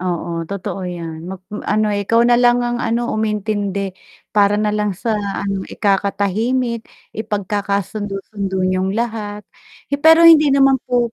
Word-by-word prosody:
Oo, 170 -2 -3
totoo 195 -1 -4
'yan. 165 -1 -7
Magm 190 +2 -8
ano 215 0 +1
ikaw 205 +3 +2
na 240 0 +4
lang 245 0 +4
ang 240 0 -2
ano, 235 +1 -1
umintindi 205 -2 -2 0.4
para 205 -1 +3
na 210 0 0
lang 210 -2 -1
sa 225 +4 -2 0.3
ano, 195 -1 -2
ikakatahimik, 215 +4 0 0.2
ipagkakasundo-sundo 200 -1 -3
niyong 185 +2 0
lahat 215 -3 -3 0.5
hi 285 - 0
pero 325 +2 +7
hindi 315 -3 +8
naman 270 -1 +4
po 240 -2 +1
210 Hz, 135 wpm, -18 LUFS, 195-235 Hz, 0.5 s, hindi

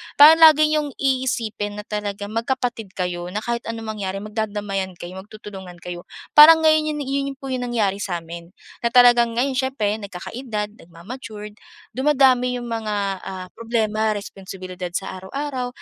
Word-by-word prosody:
Parang 310 +3 +9
lagi 310 -1 +7
niyong 300 -2 -1
iisipin 240 -6 -1
na 210 - -6
talagang 205 -1 -4
magkapatid 230 -3 -3
kayo. 175 -1 -3
Na 210 +4 -4
kahit 235 0 -3
anong 225 0 -5 0.2
mangyari 190 0 -3
magdadamayan 205 -3 -3
kayo, 180 +2 -8
magtutulungan 195 -2 -10
kayo. 175 -1 -7 0.3
Parang 320 +2 +9
ngayon, 310 -1 +3
yung 295 - -4
yun 275 +1 -1
yung - - -52
po, 270 -2 -7
yung 250 -1 -2
nangyari 205 -5 0
sa'min 170 -3 -5 0.3
na 235 - 0
talagang 240 -1 +5
ngayon 265 +3 +1
siyempre 220 -6 -1
nagkakaedad, 210 +2 -5
nagmamatured, 210 +5 -9 0.4
dumadami 260 -2 +3
yung 240 -1 -7
mga 220 -2 -2 0.3
ah, 185 -1 -7
problema, 220 -2 -1
responsibilidad 185 -2 -7
sa 190 -1 -4
araw-araw. 260 +6 -4
220 Hz, 150 wpm, -22 LUFS, 195-260 Hz, 0.4 s, Parang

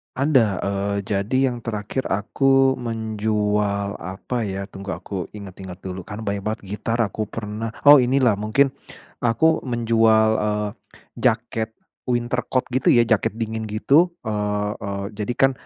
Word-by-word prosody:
Ada, 130 -9 +2
eee, 100 +1 -1
jadi 105 +5 0
yang 120 - -5
terakhir 110 +4 -3
aku 135 +6 +2
menjual 105 -3 -1
apa 95 +7 -4
ya, 100 0 -4
tunggu 95 0 -6
aku 95 -4 -5
inget-inget 95 -3 -9
dulu, 95 -1 -6
kan 105 +1 -7
banyak 100 -2 -2
banget 110 +1 -2
gitar 115 +3 -1
aku 110 0 -1
pernah. 110 +1 -5
Oh, 145 0 +9
ini 130 +1 +3
lah 115 -6 +3
mungkin 110 +7 +2 0.6
aku 160 +8 +2
menjual, 115 -2 +3
eee, 105 0 -1 0.5
jaket 110 0 0 0.3
winter 120 0 -1
coat 130 - 0
gitu 130 +1 +3
ya, 120 - +6
jaket 110 -4 +2
dingin 110 0 -3
gitu. 140 +11 +3
Eee 105 -2 -1
eee, 100 0 -3
jadi 105 +3 -2
kan 135 +2 +4
110 Hz, 145 wpm, -22 LUFS, 100-120 Hz, 0.6 s, Oh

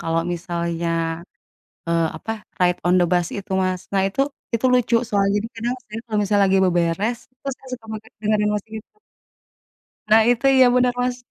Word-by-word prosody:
kalau 165 0 0
misalnya, 170 0 -3 1.0
eee, 170 0 +2
apa - - -7 0.3
Ride 180 -1 +2
On 180 - +4
The 175 - +4
Bus 175 -1 +2
itu, 195 - -10
Mas. 185 -1 -1
Nah, 195 -1 +2
itu 205 +7 -3 0.3
itu 230 +3 +2
lucu 250 -1 +3
soalnya, 200 -2 +1
jadi 210 - -3
kadang 235 +2 -2
saya 215 +1 -7
kalau 215 -2 -1
misalnya 205 0 +2
lagi 190 0 +3
beberes 180 +6 0
itu 255 +2 -21
saya 265 - -20
suka 245 -3 -6
banget 220 +1 -8
dengerin 210 -1 +1
musik 210 +1 -5
itu. - - -51 1.1
Nah, 220 +1 +7
itu. 245 +2 +1
Iya, 260 -1 +7
bener, 250 0 +3
Mas. 245 0 0
210 Hz, 180 wpm, -22 LUFS, 180-230 Hz, 1.1 s, Nah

